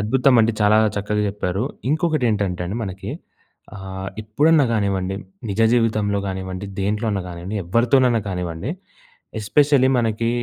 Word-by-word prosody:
అద్భుతమండి. 115 +1 +3
చాలా 105 +1 +5 0.2
చక్కగా 105 +1 -1
జెప్పారు. 100 +1 -2 0.3
ఇంకొకటి 155 -3 +1
ఏంటంటే 95 -4 -1
అండి 110 +5 -3
మనకి 95 -1 -6 0.7
ఆ! - - -9 0.4
ఎప్పుడన్నా 145 +8 +3
గానివ్వండి 95 -3 0 0.3
నిజ 100 +3 -2
జీవితంలో 110 -4 +1
గానివ్వం, 95 -1 -4
డి - - -4
దేంట్లో 105 +3 -1
అన్నా 100 -2 -1
గానియండి 90 +4 -6
ఎవ్వరితోనైనా 120 +5 +3
కానివ్వండి. 90 - -4 0.7
ఎస్పెషల్లీ 135 +4 +3
మనకి 115 0 0
105 Hz, 125 wpm, -21 LUFS, 95-120 Hz, 0.7 s, చాలా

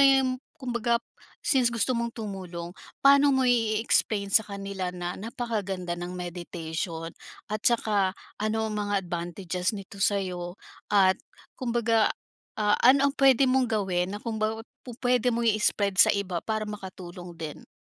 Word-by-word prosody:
yun, 265 -2 +4 0.2
kumbaga 235 -4 0 0.5
since 260 -4 +4
gusto 235 +2 +1
mong 235 -1 -2
tumulong, 185 -5 -6 0.3
paano 280 +1 +7
mo 260 - +2
ie-explain 215 -3 +2
sa 220 - +6
kanila 195 -2 -4
na 175 0 -4
napakaganda 205 -5 -3
ng 175 +1 -6
meditation 170 -1 -5 0.4
At 215 0 -2
tsaka, 205 -5 +2 0.2
ano 220 +1 0
ang 215 - -4
mga 205 -1 -1
advantages 175 +2 -2
nito 200 0 -10
sa'yo? 180 -3 -1 0.3
At 190 -2 +4 0.3
kumbaga, 230 -3 +2 0.5
ah, 210 -1 +3
ano 275 +3 +5
ang - - -27
puwede 270 -2 +5
mong 255 -1 +3
gawin 190 -2 0
na - - -6
kumbaga, 220 0 -2 0.2
pupuwede 245 0 0
mong 235 0 0
i-spread 200 -2 +2
sa - - +8
iba 185 -4 -2
para 215 -1 -2
makatulong 185 -4 -8
din? 160 -2 -7
210 Hz, 140 wpm, -27 LUFS, 180-235 Hz, 0.5 s, sa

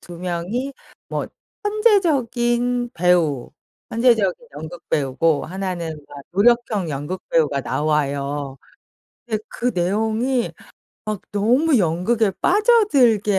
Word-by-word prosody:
2 175 -1 -11
명이 185 +10 -3 0.4
뭐 - - -3 0.4
천재적인 245 - +2
배우 165 -7 +2 0.4
천재적인 230 -3 +2
연극배우고 155 -1 -1
1는 175 -4 -4
막 145 - -10
노력형 210 -3 +2
연극배우가 150 -1 -1
나와요. 140 0 -1 0.7
근데 215 -3 -2
그 245 - -1
내용이 220 +7 0 0.5
막 215 -2 -3
너무 250 +8 +3
연극에 195 +5 +1
빠져들게 285 - +4
200 Hz, 210 characters per minute, -21 LUFS, 160-240 Hz, 0.7 s, 빠져들게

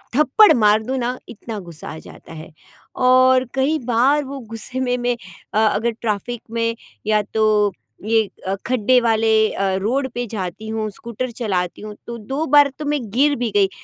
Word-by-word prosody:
थप्पड़ 305 +9 +6
मार 215 -1 +4
दूँ 260 +4 -2
ना 250 0 -2
इतना 225 0 -7
गुस्सा 170 -4 -9
आ 155 - -7
जाता - - -13
है 160 +2 -10 0.6
और 255 0 +5
कई 275 +4 +2
बार 255 +5 +3
वो 275 +1 -6
गुस्से 230 +3 -5
में, 250 -1 0
मैं 245 0 0 0.4
अ, 215 - +2
अगर 225 +2 0
ट्रैफिक 225 +2 -3
में 230 0 -1 0.3
या 215 -1 +3
तो 210 -2 +3 0.3
ये 220 -2 +2 0.2
अ, 190 - 0
खड्डे 250 0 +3
वाले 225 -1 +2 0.2
अ, 195 -1 0
रोड 260 +6 0
पे 245 0 -2
जाती 200 0 -5
हूँ 220 -1 -2
स्कूटर 235 +4 -5
चलाती 180 -5 -1
हूँ 210 0 -8
तो 235 0 -5
2 270 +8 -3
बार 290 -1 +7
तो 305 - -4
मैं 295 0 0
गिर 285 +6 +3
भी 235 -2 -2
गई 200 -1 +4
230 Hz, 180 wpm, -20 LUFS, 210-255 Hz, 0.6 s, बार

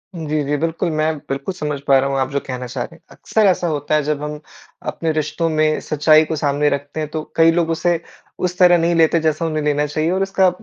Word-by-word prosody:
जी, 155 -2 -2
जी, 145 +1 -1
बिल्कुल। 165 +2 -1
मैं 155 0 0
बिल्कुल 140 +7 -3
समझ 150 -5 -4
पा 135 - +6
रहा 135 +1 0
हूँ 135 - -1
आप 130 0 0
जो 140 - 0
कहना 125 -1 -5
चाह - - -4
रहे - - -10
हैं। - - -21
अक्सर 220 -2 0
ऐसा 180 -2 +2
होता 150 -1 -1
है 150 - +2
जब 150 0 -2
हम 150 0 -5 0.5
अपने 165 -1 -2
रिश्तों 155 +2 -1
में 155 0 +1
सच्चाई 155 +1 +5
को 160 +1 -3
सामने 145 0 +1
रखते 145 +2 -4
हैं 155 -1 -3
तो 155 0 -3
कई 165 0 +5
लोग 165 -1 0
उसे 170 +1 +1 0.5
उस 180 +1 -8
तरह 175 -1 +6
नहीं 170 0 +1
लेते 165 0 +4
जैसा 155 +1 0
उन्हें 155 -2 -2
लेना 150 0 +1
चाहिए 155 +2 -1
और 190 +1 +1
उसका 190 -1 +3
155 Hz, 245 wpm, -19 LUFS, 145-165 Hz, 0.5 s, पा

